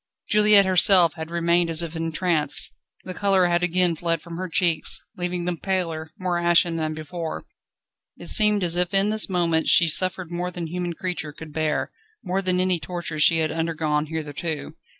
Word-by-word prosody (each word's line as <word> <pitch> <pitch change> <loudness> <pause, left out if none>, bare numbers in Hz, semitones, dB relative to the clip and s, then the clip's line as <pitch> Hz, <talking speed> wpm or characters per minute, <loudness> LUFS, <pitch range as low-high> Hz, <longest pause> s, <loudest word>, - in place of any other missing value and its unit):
Juliette 210 -1 +5
herself 185 -2 +6
had 160 0 -8
remained 170 0 0
as 165 +1 +1
if 165 0 -7
entranced. 165 -2 -1 0.3
The 185 - -7
colour 195 -1 +2
had 175 0 +1
again 180 -1 +1
fled 165 0 -1
from 170 +1 -10
her 185 0 -5
cheeks, 170 -1 +2 0.2
leaving 175 -1 -3
them 175 -1 -2
paler, 165 -5 -3
more 180 -2 -2
ashen 170 0 +2
than 155 -1 -3
before. 160 +1 -6 0.7
It - - -8
seemed 210 -3 +4
as 170 -1 +1
if 180 +2 0
in 195 +2 +3
this 215 -1 +2
moment 170 -3 0
she 170 - +5
suffered 185 +1 +1
more 175 +1 -3
than 175 -2 -6
human 175 +1 -4
creature 170 -4 -5
could 155 0 -12
bear, 155 -1 -2 0.3
more 190 0 -2
than 185 -1 -1
any 185 -1 0
torture 165 0 -6
she 165 +2 +5
had 160 -1 -1
undergone 155 -2 -2
hitherto. 155 0 -5
175 Hz, 180 wpm, -23 LUFS, 160-180 Hz, 0.7 s, herself